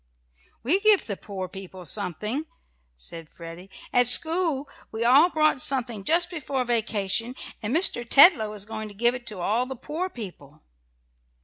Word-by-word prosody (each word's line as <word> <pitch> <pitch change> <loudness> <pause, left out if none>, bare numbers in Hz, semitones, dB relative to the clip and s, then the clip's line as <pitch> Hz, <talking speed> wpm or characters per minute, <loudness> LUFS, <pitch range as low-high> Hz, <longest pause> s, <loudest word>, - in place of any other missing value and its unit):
"We 320 +11 +3
give 420 -1 +5
the 200 - -4
poor 190 -1 -7
people 185 -1 -10
something," 210 - -3 0.5
said 155 - -10
Freddie. 170 +3 -11 0.2
"At 245 -1 +4
school 320 +1 +3 0.2
we 225 +1 -3
all 280 +8 +6
brought 310 -5 +1
something 240 -7 -1
just 345 - +2
before 280 -6 -3
vacation, 230 0 -2 0.3
and 215 0 -4
Mr. 325 -8 +3
Tetlow 275 - +6
is 205 -1 -7
going 220 0 -6
to 205 - -13
give 240 +3 +2
it 245 -2 -9
to 210 - -5
all 220 +8 -1
the 265 - -6
poor 315 +9 -5
people." 165 - -11
235 Hz, 155 wpm, -25 LUFS, 200-285 Hz, 0.5 s, all